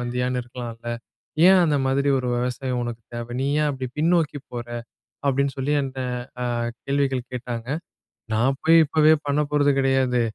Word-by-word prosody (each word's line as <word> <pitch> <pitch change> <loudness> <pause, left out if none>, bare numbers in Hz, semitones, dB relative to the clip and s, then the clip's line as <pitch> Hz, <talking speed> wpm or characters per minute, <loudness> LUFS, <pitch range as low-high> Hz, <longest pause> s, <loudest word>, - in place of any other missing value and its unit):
வந்தியான்னு 125 +1 -1
இருக்கலாம்ல. 120 -1 -8 0.6
ஏன் 190 -1 +7
அந்த 150 -3 +2
மாதிரி 140 +1 +1
ஒரு 125 - -3
விவசாயம் 125 +1 -2
உனக்கு 120 -1 -5
தேவை? 120 0 -5
நீ 135 - 0
ஏன் 150 - +2
அப்படி 130 -2 -4
பின்னோக்கி 160 -2 +2
போற?" 120 -1 -5 0.6
அப்படின்னு 140 0 +2
சொல்லி 135 +2 0
என்ட்ட 135 -1 -4 0.4
அ - - -1 0.4
கேள்விகள் 135 -3 0
கேட்டாங்க. 120 -1 -5 0.7
"நான் 130 +5 +2
போய் 165 +1 +7
இப்பவே 155 +1 +5
பண்ண 145 +1 +2
போறது 145 -1 +4
கிடையாது. 130 -2 +2
130 Hz, 150 wpm, -24 LUFS, 125-145 Hz, 0.7 s, ஏன்